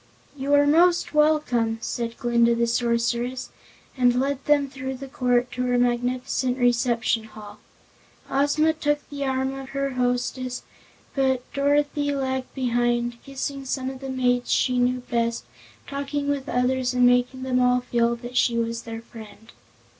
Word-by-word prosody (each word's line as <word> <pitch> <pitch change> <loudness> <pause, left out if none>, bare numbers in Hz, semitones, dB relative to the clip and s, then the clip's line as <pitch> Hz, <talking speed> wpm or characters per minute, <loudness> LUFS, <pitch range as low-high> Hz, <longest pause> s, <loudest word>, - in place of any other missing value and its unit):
"You 280 +1 +1
are 285 0 +5
most 340 +4 +3
welcome," 300 -7 +2
said 230 +1 -4
Glinda 235 -2 +3
the 235 0 +2
Sorceress, 235 +2 -1 0.5
and 245 -1 +3
led 275 0 -1
them 290 -1 +3
through 265 0 -5
the 270 +1 -8
court 250 -1 0
to 250 - -4
her 245 0 +2
magnificent 245 +1 0
reception 240 -2 +1
hall. 215 -1 -12 0.7
Ozma 290 +3 +2
took 295 -2 -1
the 285 -1 -4
arm 265 0 -1
of 270 -1 -8
her 275 0 -2
hostess, 250 0 -2 0.5
but 265 -2 +1
Dorothy 285 0 +1
lagged 260 -1 -2
behind, 240 -2 0
kissing 275 0 -5
some 260 0 -3
of 265 - -10
the 270 0 -6
maids 245 -1 0
she 250 -1 +2
knew 250 +1 +1
best, 235 - -2 0.4
talking 285 +1 -3
with 280 -2 -2
others, 250 +1 0
and 250 0 +4
making 245 +1 +2
them 255 -1 +1
all 250 0 +3
feel 235 -1 +1
that 240 +1 -9
she 240 -1 +2
was 230 0 -1
their 230 0 -7
friend. 220 -1 -13
250 Hz, 155 wpm, -24 LUFS, 240-275 Hz, 0.7 s, are